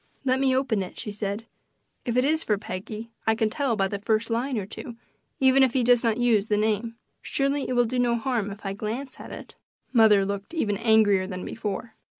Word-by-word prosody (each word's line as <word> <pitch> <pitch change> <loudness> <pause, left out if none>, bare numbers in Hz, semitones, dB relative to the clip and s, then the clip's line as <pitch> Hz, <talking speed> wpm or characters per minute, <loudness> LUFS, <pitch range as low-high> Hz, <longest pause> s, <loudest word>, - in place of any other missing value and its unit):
"Let 260 0 +2
me 265 -1 +3
open 260 -6 +1
it," 185 - -7
she 210 - -5
said. 205 +1 -4 0.6
"If 240 0 -1
it 250 - +4
is 315 +2 +1
for 210 - +1
Peggy 215 +3 -7 0.2
I 220 - +4
can 220 -1 0
tell 275 -4 0
by 195 -2 +1
the 200 +1 -4
first 220 +2 0
line 245 +2 0
or 200 - -2
two, 230 +3 -9 0.4
even 265 0 +5
if 260 -2 +4
he 260 - +2
does 245 0 +4
not 225 -1 +2
use 230 -4 +2
the 210 - +1
name. 220 +2 0 0.3
Surely 275 +1 -1
it - - 0
will 245 -1 +3
do 250 +2 -2
no 240 -1 +2
harm 230 -3 -1
if 200 +1 -10
I 195 - -2
glance 225 +7 -5
at - - -9
it." - - -9 0.4
Mother 215 -4 +6
looked 200 - -5
even 205 -10 0
angrier 215 -4 +4
than 185 -2 -5
before. 220 +1 -5
225 Hz, 220 wpm, -26 LUFS, 205-250 Hz, 0.6 s, Mother